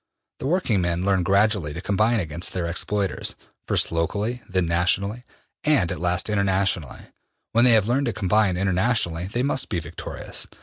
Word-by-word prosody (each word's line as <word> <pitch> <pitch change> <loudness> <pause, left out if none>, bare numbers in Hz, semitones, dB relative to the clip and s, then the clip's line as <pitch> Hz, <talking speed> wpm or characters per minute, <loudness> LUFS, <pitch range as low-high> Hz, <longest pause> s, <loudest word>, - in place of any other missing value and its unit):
The 130 - -3
working 140 - +1
men 85 +1 -1
learn 95 -2 +2
gradually 100 -4 +2
to - - -4
combine 110 +4 +2
against 85 -1 -3
their 90 -2 -2
exploiters, 95 +3 -1 0.3
first - - +1
locally, 105 +9 -1
then 95 -2 +1
nationally, 95 +7 0 0.4
and 140 - +3
at - - -4
last 90 0 0
internationally. 95 -6 0 0.5
When 120 +2 +4
they 125 - +7
have 110 -2 +4
learned 135 +3 +1
to 115 - 0
combine 100 -1 +2
internationally 95 -2 +1
they 120 +6 -2
must 135 -1 -1
be 85 - -1
victorious. 80 +1 -6
100 Hz, 165 wpm, -24 LUFS, 85-110 Hz, 0.5 s, they